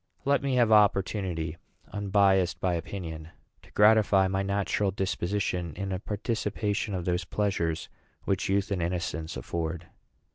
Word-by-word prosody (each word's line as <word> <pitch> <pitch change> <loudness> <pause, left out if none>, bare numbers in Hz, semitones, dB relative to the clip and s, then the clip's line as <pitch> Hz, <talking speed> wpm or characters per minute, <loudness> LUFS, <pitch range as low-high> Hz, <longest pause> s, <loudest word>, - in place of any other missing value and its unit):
Let 140 +1 +3
me 135 -2 0
have 120 -3 +3
opportunity, 95 -6 +2 0.4
unbiased 100 -3 +2
by 90 -1 0
opinion, 80 -2 -5 0.3
to - - -19
gratify 105 -2 +5
my 95 +1 0
natural 100 0 0
disposition 95 -2 -2
in 100 -1 -4
a 95 - -2
participation 105 -1 -2
of 90 -2 -3
those 90 0 0
pleasures 85 -4 -1 0.4
which 95 - -1
youth 100 +1 +1
and 95 -3 0
innocence 85 -2 -3
afford." 85 +1 -4
95 Hz, 135 wpm, -28 LUFS, 85-105 Hz, 0.4 s, gratify